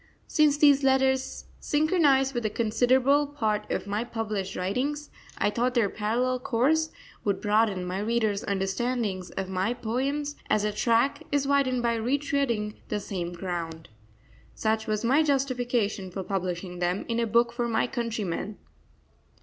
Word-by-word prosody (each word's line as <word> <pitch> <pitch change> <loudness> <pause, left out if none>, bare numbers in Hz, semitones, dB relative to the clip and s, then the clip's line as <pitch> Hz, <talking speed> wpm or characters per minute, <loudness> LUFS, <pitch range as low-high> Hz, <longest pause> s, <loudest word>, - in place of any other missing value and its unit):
Since 300 -2 +3
these 285 -2 +5
letters 265 0 +2
synchronise 295 -4 +3
with 240 -2 -2
a 215 - +1
considerable 255 +6 +3
part 215 -7 -2
of - - -1
my 205 +3 -1
published 215 -5 -3
writings, 275 +11 -2 0.3
I 205 - +1
thought 245 +3 0
their 225 -5 +2
parallel 245 +4 0
course 280 +7 +1 0.3
would 200 -2 0
broaden 210 -3 +1
my 180 +2 -3
readers' 215 -1 0
understanding 200 +1 -1
of 190 - -2
my 190 +5 -1
poems 275 +5 -2
as 210 - +2
a 210 - +1
track 235 +7 +2
is 285 -1 +1
widened 265 -3 +2
by 235 -1 +1
retreading 250 -4 0
the 210 - -2
same 175 -4 -4
ground. 170 -3 -5 0.7
Such 220 0 0
was 215 +1 -1
my 270 +6 +4
justification 245 -8 0
for 190 +1 -5
publishing 180 -1 -3
them 180 +2 -1
in 235 0 -1
a 230 - +1
book 235 +2 +3
for 240 0 -1
my 225 -1 +1
countrymen. 220 -5 -3
235 Hz, 150 wpm, -27 LUFS, 205-265 Hz, 0.7 s, these